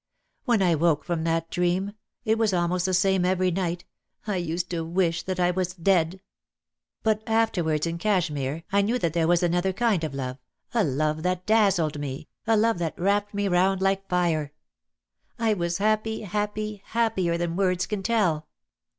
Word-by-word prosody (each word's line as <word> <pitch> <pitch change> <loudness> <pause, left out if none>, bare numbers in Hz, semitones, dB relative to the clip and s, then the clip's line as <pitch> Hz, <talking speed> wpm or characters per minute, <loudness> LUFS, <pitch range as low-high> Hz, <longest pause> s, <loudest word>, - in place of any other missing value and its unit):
When 235 -7 +3
I 175 -2 +3
woke 160 -1 +2
from 170 -2 -2
that 165 0 -1
dream 180 +3 0 0.2
— - - -51
it 220 0 +2
was 220 -3 +2
almost 175 +1 0
the 185 - 0
same 190 0 +2
every 185 0 +2
night 175 -1 -2 0.2
— - - -42
I 205 -3 -1
used 175 0 -2
to 165 -2 -2
wish 170 0 0
that 185 -1 -4
I 180 0 +3
was 180 0 -2
dead. 180 0 +1 0.8
But 215 -1 +2
after 225 -5 +2
wards 155 -1 0
in 170 0 -3
Cashmere 165 -7 -1
I 200 +1 +4
knew 225 +5 +1
that 170 -9 -1
there 165 -2 +1
was 175 +1 +3
another 175 +2 +1
kind 205 -4 +1
of 150 -3 -3
love, 130 -1 -4 0.3
a 230 -3 +3
love 155 +1 0
that 180 +1 -1
dazzled 195 -9 +2
me, 140 0 -6 0.2
a 225 -1 +4
love 225 -3 +2
that 170 +1 -3
wrapped 205 +2 +1
me 205 0 0
round 190 +1 +2
like 195 0 0
fire. 165 -5 0 0.8
I 225 -2 +2
was 170 -3 -1
happy, 215 +2 0
happy, 210 0 -3
happier 220 -7 0
than 170 -1 -2
words 185 -2 +1
can 210 -2 -3
tell." 185 -8 +1
180 Hz, 185 wpm, -26 LUFS, 165-205 Hz, 0.8 s, I